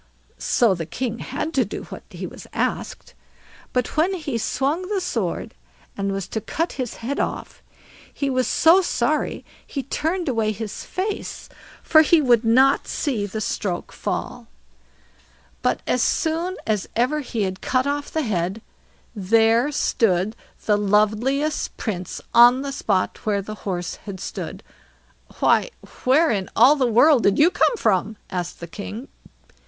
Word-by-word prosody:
So 230 -5 +3
the 165 -3 -5
king 235 +4 -3
had 310 +5 -4
to 265 - +3
do 205 - -6
what - - -9
he - - -6 0.3
asked; - - -3 0.6
but 250 -2 -1
when 345 +5 +2
he 285 -9 -3
swung 285 +10 -1
the 405 - +1
sword 225 - -3 0.4
and 200 0 -2
was 195 -1 -3
to 220 - -3
cut 330 - -2
his 255 -4 -4
head 280 +3 -2
off, - - -4 0.5
he 280 - -2
was 255 -1 +1
so 335 +4 +5
sorry 360 - -1 0.2
he 275 - -4
turned 330 +6 -2
away 225 -4 +1
his 210 0 -6
face, 395 +3 -4 0.3
for 315 - +6
he 320 +1 +5
would 245 -5 +4
not 260 +5 +4
see 230 -9 -1
the 215 +2 -5
stroke 195 -3 -3
fall. - - -4 1.1
But - - 0
as 250 - +1
soon 330 +7 0
as 210 -3 -1
ever 255 +6 +1
he 240 -6 -3
had 185 -1 -3
cut 255 0 +1
off 285 0 -2
the 315 - -1
head, 195 -1 -2 0.5
there 225 +6 +3
stood 215 -6 +1 0.3
the 210 -1 +3
loveliest 215 +9 +1
Prince 185 -5 -4
on 245 +3 +7
the 280 - -4
spot 200 -8 -1
where 200 -2 0
the 215 - -6 0.2
horse 175 -2 -3
had 195 -2 -6
stood. - - -6 0.8
"Why, - - +3 0.4
where 300 +6 +4
in 195 -4 -2
all 255 +6 +7
the 265 -4 +1
world 245 +4 +5
did 200 -2 +3
you 325 +4 +5
come 480 - +2
from?" 215 - +1
asked 180 -2 -4
the - - -4
king. 210 - -7
235 Hz, 155 wpm, -22 LUFS, 205-290 Hz, 1.1 s, on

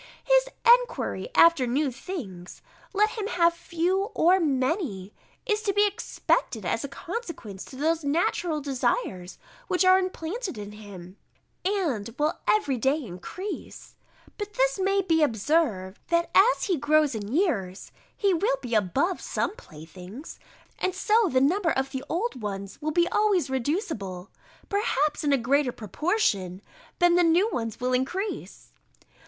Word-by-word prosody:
His - - +4 0.3
enquiry - - -5
after 335 -7 +6
new 275 +3 0
things, 235 - -8 0.3
let 425 +2 +2
him 425 -3 -4
have 340 -3 +3
few 345 +3 -1
or 360 +3 +4
many, 260 - -1 0.3
is 425 -3 0
to 410 -2 0
be 410 +1 +4
expected 405 - -1
as 225 - -1
a - - -3
consequence 280 - -7
to - - -12
those 315 +4 0
natural 315 +1 0
desires 250 - -2 0.3
which 370 0 +2
are 370 0 +7
implanted 370 - -4
in 205 0 -7
him, 200 -3 -11 0.5
and 295 - -1
will 300 +1 0
every 290 -12 +2
day 265 +6 +2
increase: 225 - -7 0.5
but 415 0 -5
this - - +1
may 390 +1 +2
be 325 -3 +2
observed, 220 - +1
that 340 0 +1
as 435 +6 +5
he 370 -5 +1
grows 300 0 +3
in 210 -1 -5
years, 225 - -1 0.3
he 400 -2 +2
will 335 -4 +1
be 245 -3 -6
above 260 - +1
some - - -2
playthings, 180 - -11 0.4
and 370 0 -1
so 425 +1 +3
the 255 - +3
number 335 +7 +2
of 265 -2 -1
the 265 -1 -4
old 360 - -2
ones 200 -1 -6
will 305 - -1
be 345 +2 +2
always 390 -10 +2
reducible, 240 - -3 0.4
perhaps 310 - 0
in 290 - +2
a 275 - +4
greater 265 +2 +1
proportion, 215 - -1 0.4
than 350 0 +4
the 355 - +5
new 340 +5 +4
ones 225 - -3
will 255 +1 -1
increase. 355 +12 -3
310 Hz, 150 wpm, -26 LUFS, 230-380 Hz, 0.5 s, are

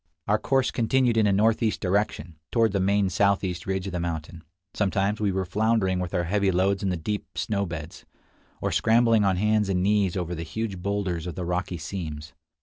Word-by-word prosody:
Our 105 +1 +2
course 135 +1 +1
continued 120 0 +2
in 110 -2 +4
a - - +3
northeast 110 +2 +2
direction, 90 -4 -1
toward 115 -3 +3
the 100 - 0
main 100 0 +2
southeast 95 -2 0
ridge 95 -1 -1
of 100 - -4
the 90 - -1
mountain. 85 0 -5 0.3
Sometimes 100 +1 0
we 100 -2 +2
were 95 0 -1
floundering 100 -1 +1
with 90 -1 -3
our 90 - +1
heavy 100 +3 +1
loads 95 +2 +1
in 100 - 0
the 90 - -1
deep 105 +6 -5
snow 100 -2 -1
beds, 80 -1 -7 0.6
or - - -1
scrambling 115 -1 +4
on 95 -2 +2
hands 105 0 +2
and 90 -1 +1
knees 100 -2 +2
over 90 -1 -3
the 85 - -5
huge 100 +3 -4
boulders 95 -4 -2
of 90 - -5
the 90 -2 -4
rocky 90 0 -2
seams. 80 -3 -6
95 Hz, 200 wpm, -26 LUFS, 90-105 Hz, 0.6 s, in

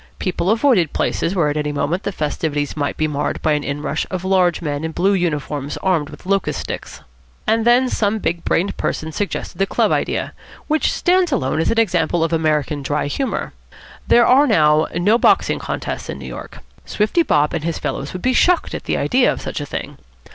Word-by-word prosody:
People 185 -1 -1
avoided 220 - +3
places 175 +4 -1
where 160 -5 +2
at 145 - -2
any 150 -1 -1
moment 150 +5 -1
the 200 - -3
festivities 150 -3 -2
might 145 -2 -2
be 155 - +1
marred 145 -1 -2
by 155 - +2
an 150 -1 +1
inrush 145 +1 -2
of 185 -1 -4
large 185 -3 +2
men 145 -2 -3
in 160 0 -3
blue 195 +5 +2
uniforms 150 -5 -2
armed 165 -6 +1
with - - -13
locust 195 0 0
sticks. - - -6 0.4
And 225 +1 +1
then 245 +2 +5
some 215 -3 0
big 170 -5 -2
brained 195 +4 0
person 160 0 -2
suggested 200 +4 -4
the 195 - +2
club - - +1
idea, - - -1 0.3
which 310 0 +1
stands 360 -1 +2
alone 155 - 0
as 165 - +1
an 230 - 0
example 175 -5 +1
of 165 0 -1
American 155 -2 0
dry 145 +2 -1
humour. 255 - -3 0.5
There 240 0 +5
are 275 +3 +5
now 155 - +4
no 205 +7 +3
boxing - - +3
contests - - -4
in - - -4
New - - -9
York. - - -9 0.2
Swifty 215 +11 +1
Bob 150 - +2
and 155 - -2
his 165 -1 -2
fellows 140 - -4
would 185 - -7
be 255 - +2
shocked 355 +6 +2
at - - -5
the - - 0
idea 255 0 +3
of - - -4
such - - -4
a 145 - -5
thing. - - -6
170 Hz, 205 wpm, -19 LUFS, 150-210 Hz, 0.5 s, then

